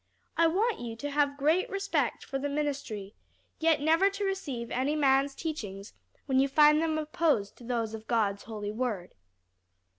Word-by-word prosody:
I 335 - +4
want 420 +7 +1
you 235 -2 -5
to 290 +5 -5
have 285 -1 +1
great 315 +6 +2
respect 395 0 -1
for 270 - -3
the 285 +1 -2
ministry, 280 -9 -3 0.5
yet 320 -2 +3
never 325 +6 +4
to 400 +1 -3
receive 275 -12 -3
any 270 +4 0
man's 275 -1 +3
teachings 210 - -5 0.3
when 265 -2 +2
you 270 - +4
find 300 +2 +5
them 320 -1 0
opposed 300 -9 0
to - - -14
those 230 -2 -2
of 220 0 -8
God's 205 -4 0
holy 210 -2 -5
word." 215 -6 -3
280 Hz, 170 wpm, -29 LUFS, 230-315 Hz, 0.5 s, find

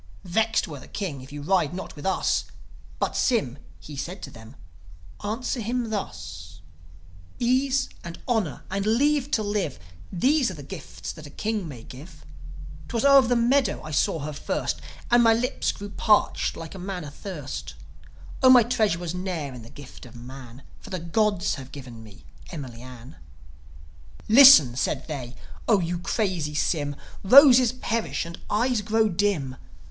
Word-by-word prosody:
Vexed 220 +5 +1
were 150 -4 -8
the - - -13
King 170 -10 -5
if 130 - -13
you 145 0 -7
ride 175 -2 +1
not 190 - -7
with 145 +4 -5
us." 190 - +1 0.5
But - - -2
Sym, 145 - 0 0.2
he 150 - -10
said 175 +7 -6
to - - -7
them, 110 -1 -13 0.7
"Answer 235 +5 -2
him 235 +1 -2
thus: 80 - -6 0.8
'Ease 260 +2 +1 0.2
and 170 0 -7
honour 220 - -1
and 195 +1 -1
leave 285 +5 +2
to 220 - +1
live 205 -9 -2 0.3
These 265 - +2
are 185 - -7
the 145 - -9
gifts 165 +2 -8
that 155 -3 -11
a - - -11
king 210 +1 -3
may 125 -7 -9
give 150 +6 -13 0.6
'Twas 235 +1 -1
over 275 -3 +7
the 245 - +2
meadow 250 +3 +2
I 155 - -7
saw 150 +2 +1
her 150 +1 -5
first; 75 - -3 0.3
And 240 0 +6
my 225 -1 +5
lips 250 +3 -1
grew 205 0 -9
parched 210 0 +2
like 165 -1 -8
a 190 - -9
man 180 -1 -5
athirst 145 -1 -7 0.7
Oh, 260 - +7
my 250 -2 +8
treasure 220 -6 +1
was 175 -1 -4
ne'er 180 -7 -4
in 125 - -9
the 115 - -13
gift 135 -2 -12
of 120 - -15
man; 125 +1 -11 0.2
For - - -13
the 185 - -3
gods 200 +3 0
have 130 -1 -10
given 125 -5 -10
me 105 -1 -15 0.3
Emily 130 -8 -8
Ann." 125 0 -12 1.1
"Listen," 225 - +9
said 135 +1 -2
they, 130 -6 -6 0.3
"O 215 -4 +4
you 175 0 -2
crazy 180 -6 -2
Sym. 145 -2 0 0.3
Roses 255 +2 +8
perish, 230 -6 -2
and 170 0 -9
eyes 235 +2 +1
grow 220 +1 +2
dim. 175 -9 -1
180 Hz, 165 wpm, -25 LUFS, 140-225 Hz, 1.1 s, Listen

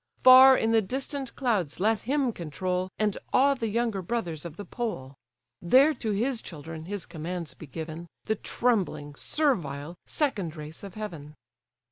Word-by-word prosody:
Far 260 +1 +10
in 225 - +1
the 225 -1 +5
distant 265 +4 -4
clouds 210 - -1
let 215 +2 +2
him 275 -4 +1
control, 180 +3 -3
And 210 -2 0
awe 280 +2 +5
the 235 -4 -3
younger 225 -2 0
brothers 175 -6 -3
of 170 -2 -8
the 205 - -7
pole; 215 - -4 0.5
There 265 - +5
to 235 -5 -4
his 230 +4 0
children 160 0 -8
his 200 0 -5
commands 170 +1 -5
be 160 - -11
given, 160 +3 -7 0.2
The 220 - +1
trembling, 195 -11 -1
servile, 170 - -1
second 205 - -1
race 155 0 -8
of 195 -3 -9
heaven." 165 -9 -7
200 Hz, 155 wpm, -27 LUFS, 160-240 Hz, 0.5 s, Far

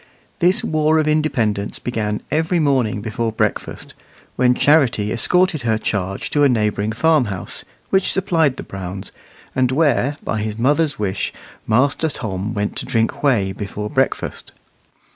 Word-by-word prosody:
This 180 +2 +3
war 155 0 +2
of 155 -1 +1
independence 130 -10 0
began 105 -3 -3
every 160 +4 +1
morning 130 -9 +1
before 110 +1 -2
breakfast, 110 - -3 0.4
when 125 0 +3
Charity 130 -9 +3
escorted 180 +5 +2
her 110 -2 +1
charge 95 -3 -3
to 145 - +2
a 145 - +6
neighbouring 105 -3 0
farmhouse, 115 - 0 0.3
which 190 -1 +3
supplied 165 -8 +1
the - - -6
Browns, 95 0 -6 0.4
and 130 -1 +2
where, 145 -1 +2
by 110 - -2
his 105 0 -3
mother's 145 +5 +2
wish, 100 -2 -2 0.4
Master 140 +8 +2
Tom 110 -5 -4
went 105 0 -2
to - - -2
drink 115 +5 0
whey 115 -10 +2
before 105 +1 -5
breakfast. 135 -2 -1
125 Hz, 145 wpm, -20 LUFS, 105-150 Hz, 0.4 s, a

